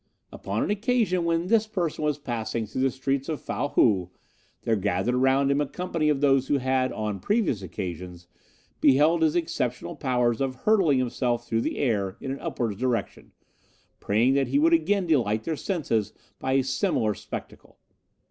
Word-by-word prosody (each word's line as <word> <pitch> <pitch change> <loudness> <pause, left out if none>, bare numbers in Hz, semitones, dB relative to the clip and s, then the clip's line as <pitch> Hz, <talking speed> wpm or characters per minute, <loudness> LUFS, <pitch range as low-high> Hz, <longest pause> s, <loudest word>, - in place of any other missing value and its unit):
'Upon - - -3
an - - -1
occasion 210 -5 +1
when 165 0 +1
this 220 +2 +2
person 175 -7 -2
was 150 -1 0
passing 115 -4 -3
through 110 +5 -4
the 135 - +3
streets 135 +2 -2
of 155 - -2
Fow 145 - -3
Hou, 95 -10 +2 0.5
there 115 - +1
gathered 100 +3 0
around 135 +2 +3
him 140 +1 +2
a 145 - -1
company 165 -2 -1
of 145 -2 +1
those 135 -2 +3
who 145 - +2
had, 130 0 0
on 105 -2 -3
previous 190 - 0
occasions, 90 -2 -6 0.5
beheld 155 +5 +4
his 160 0 +2
exceptional 160 -8 -2
powers 125 -3 0
of 135 -1 -1
hurtling 190 -10 +4
himself 120 -1 -1
through 115 0 0
the - - -2
air 105 -6 0
in 135 - -5
an 135 - -5
upward 110 -5 -3
direction, 125 -2 -2 0.7
praying 115 +6 +2
that 135 -1 +2
he 135 +3 +1
would 165 +3 +4
again 180 +4 +2
delight 115 -9 +1
their 160 - -2
senses 115 - -1 0.3
by 130 - -1
a 135 0 +3
similar 130 -4 0
spectacle. - - -9
135 Hz, 175 wpm, -26 LUFS, 115-160 Hz, 0.7 s, beheld